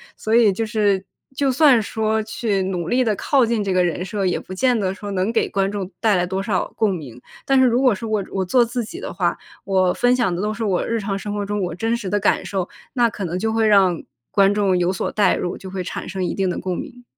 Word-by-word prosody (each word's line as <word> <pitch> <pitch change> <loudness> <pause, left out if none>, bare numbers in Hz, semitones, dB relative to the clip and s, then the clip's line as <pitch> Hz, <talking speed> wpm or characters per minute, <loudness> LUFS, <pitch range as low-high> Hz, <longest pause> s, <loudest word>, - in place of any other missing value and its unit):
所 220 - -3
以 225 -4 +5
就 225 +4 -2
是， 205 -3 +1 0.3
就 275 0 +1
算 270 -3 +5
说 220 +1 -1
去 215 -3 -1
努 180 -3 -3
力 255 +4 +2
地 220 -3 +1
靠 270 -4 +3
近 225 -2 0
这 195 -2 -1
个 185 -1 +3
人 175 +1 -1
设， 200 -1 -2
也 180 - 0
不 185 - -9
见 245 +4 +2
得 190 -2 -1
说 205 0 -7
能 190 +1 0
给 230 - +1
观 195 0 0
众 200 -2 -5
带 215 -2 +3
来 180 -1 +1
多 190 +2 -2
少 195 -2 -1
共 210 -3 +2
鸣。 125 -7 -9 0.2
但 270 -1 +3
是 260 - +6
如 245 +1 +3
果 255 -4 +4
是 205 +3 -6
我 215 -2 -1
我 190 -1 -1
做 245 +7 +4
自 235 0 -3
己 340 - -9
的 - - -6
话， - - 0 0.3
我 185 -2 +2
分 245 +1 +3
享 235 -8 +1
的 175 - -3
都 210 +1 -1
是 225 - -4
我 195 -4 0
日 230 -1 -1
常 195 -1 -3
生 205 +1 -5
活 205 -1 -2
中 205 0 -2
我 175 -3 -3
真 225 +5 0
实 205 -5 -5
的 205 - +1
感 205 - +1
受， 190 -3 -3 0.2
那 240 -3 +3
可 205 -3 -5
能 175 +1 -3
就 220 +3 -1
会 225 0 +2
让 195 -5 +4 0.3
观 200 -1 +4
众 200 -3 +2
有 180 +1 +1
所 185 - -3
带 205 -2 +3
入， 175 - -3
就 190 - -9
会 185 -1 -4
产 180 - -6
生 190 -1 -3
一 180 - -1
定 190 -2 0
的 - - -2
共 185 -1 -3
鸣。 245 -3 -8
205 Hz, 290 characters per minute, -21 LUFS, 185-225 Hz, 0.3 s, 是